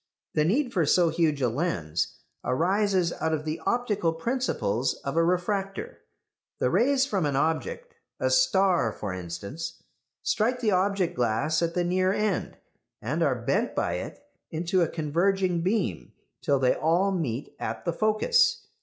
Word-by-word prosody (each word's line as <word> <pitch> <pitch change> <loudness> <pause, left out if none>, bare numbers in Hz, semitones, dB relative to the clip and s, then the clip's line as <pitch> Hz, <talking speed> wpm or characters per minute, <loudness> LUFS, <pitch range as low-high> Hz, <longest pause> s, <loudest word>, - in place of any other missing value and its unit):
The 150 - +2
need 245 - +1
for 180 -6 +2
so 170 +3 +4
huge 155 -4 +1
a - - +4
lens 110 - -2 0.3
arises 185 +5 +1
out 160 0 +1
of 155 0 -6
the 155 +1 -3
optical 210 -9 +1
principles 135 - -1
of 140 - -3
a 165 - +4
refractor. 195 - -1 0.6
The - - +1
rays 270 +2 +3
from 195 - 0
an 140 - -1
object 465 - -1 0.3
a 130 - +1
star, 175 - +3
for 105 -2 -5
instance 95 - -6 0.4
strike 240 +4 +1
the 225 -4 +1
object 190 -1 +1
glass 125 +7 +1
at 170 0 -1
the 180 - +2
near 185 +1 +2
end, 210 +1 -1 0.4
and - - -2
are - - +3
bent - - 0
by - - 0
it - - -7 0.3
into 175 +3 0
a 170 - +3
converging 175 +3 +1
beam, 185 - -1 0.3
till 140 - +2
they 130 -1 +3
all 175 +5 +2
meet 145 -9 -3
at - - -4
the 170 - 0
focus. 460 - +2
175 Hz, 155 wpm, -27 LUFS, 150-200 Hz, 0.6 s, so